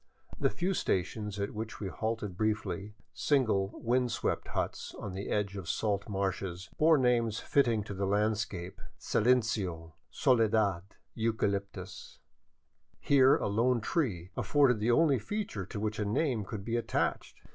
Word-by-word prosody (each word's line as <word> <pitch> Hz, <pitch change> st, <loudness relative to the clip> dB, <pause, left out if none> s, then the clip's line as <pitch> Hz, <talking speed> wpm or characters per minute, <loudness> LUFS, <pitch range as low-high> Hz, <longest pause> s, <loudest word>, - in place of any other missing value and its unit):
The -, -, +3 dB
few 185 Hz, +2 st, -1 dB
stations 105 Hz, -, -1 dB
at 100 Hz, -, -2 dB
which 110 Hz, +2 st, -5 dB
we 100 Hz, -, -3 dB
halted 110 Hz, +1 st, -3 dB
briefly, 105 Hz, -1 st, -2 dB, 0.2 s
single, 110 Hz, -9 st, +2 dB
wind 125 Hz, +1 st, +1 dB
swept -, -, -1 dB
huts -, -, -3 dB
on 95 Hz, -, -6 dB
the 95 Hz, +2 st, -5 dB
edge 100 Hz, -1 st, -1 dB
of 95 Hz, -5 st, -6 dB
salt 105 Hz, -1 st, -1 dB
marshes, 95 Hz, -2 st, -3 dB
bore 160 Hz, 0 st, +6 dB
names 120 Hz, -4 st, +2 dB
fitting 120 Hz, -6 st, +2 dB
to 100 Hz, -, -7 dB
the 100 Hz, 0 st, -2 dB
land 105 Hz, +1 st, +2 dB
scape,— 90 Hz, -5 st, -5 dB, 0.2 s
Silencio, 100 Hz, -9 st, +1 dB, 0.2 s
Soledad, 110 Hz, -, +2 dB, 0.3 s
Eucalyptus 100 Hz, -4 st, -3 dB, 0.4 s
— 80 Hz, 0 st, -42 dB
here 135 Hz, -1 st, +6 dB
a -, -, -3 dB
lone 120 Hz, +4 st, +2 dB
tree 105 Hz, -, -1 dB
afforded 135 Hz, -6 st, +3 dB
the 110 Hz, +3 st, 0 dB
only 140 Hz, +1 st, +4 dB
feature 110 Hz, -, -4 dB
to 105 Hz, -, -5 dB
which 110 Hz, 0 st, -2 dB
a -, -, +1 dB
name 110 Hz, 0 st, 0 dB
could 100 Hz, -1 st, -6 dB
be 115 Hz, +1 st, 0 dB
attached. 120 Hz, -, -2 dB
105 Hz, 150 wpm, -31 LUFS, 95-120 Hz, 0.4 s, bore